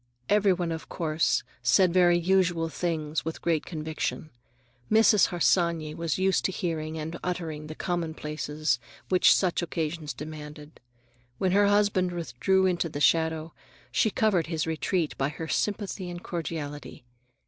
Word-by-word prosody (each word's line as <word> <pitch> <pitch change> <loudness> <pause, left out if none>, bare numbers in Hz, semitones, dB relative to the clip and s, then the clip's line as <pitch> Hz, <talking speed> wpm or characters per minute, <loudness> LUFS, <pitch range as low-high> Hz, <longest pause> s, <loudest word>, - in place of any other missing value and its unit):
Every 205 -1 +4
one, 175 -2 -1
of 160 0 -6
course, 160 -2 0 0.2
said 170 +9 +4
very 175 -1 +5
usual 175 -2 +2
things 160 -3 -2
with 160 - -5
great 165 -3 0
conviction. 155 -1 -4 0.6
Mrs. 220 -2 +6
Harsanyi 170 -3 +1
was 165 -2 -2
used 190 0 +2
to - - +1
hearing 160 -3 -3
and 160 +2 -5
uttering 160 -4 -4
the 155 - -7
commonplaces 155 -5 -2 0.3
which 185 -1 +5
such 185 -2 +2
occasions 160 -2 -3
demanded. 150 0 -9 0.6
When 185 +5 +1
her 200 +2 +4
husband 200 -3 +2
withdrew 175 +4 +1
into 175 -2 +1
the 145 - -5
shadow, 160 +1 +2 0.4
she 220 - +2
covered 205 -7 +1
his 160 -2 -1
retreat 160 +1 -1
by 135 +1 +1
her 160 +2 -6
sympathy 200 -1 -2
and 175 0 -7
cordiality. 150 -6 -5
165 Hz, 140 wpm, -27 LUFS, 155-180 Hz, 0.6 s, Mrs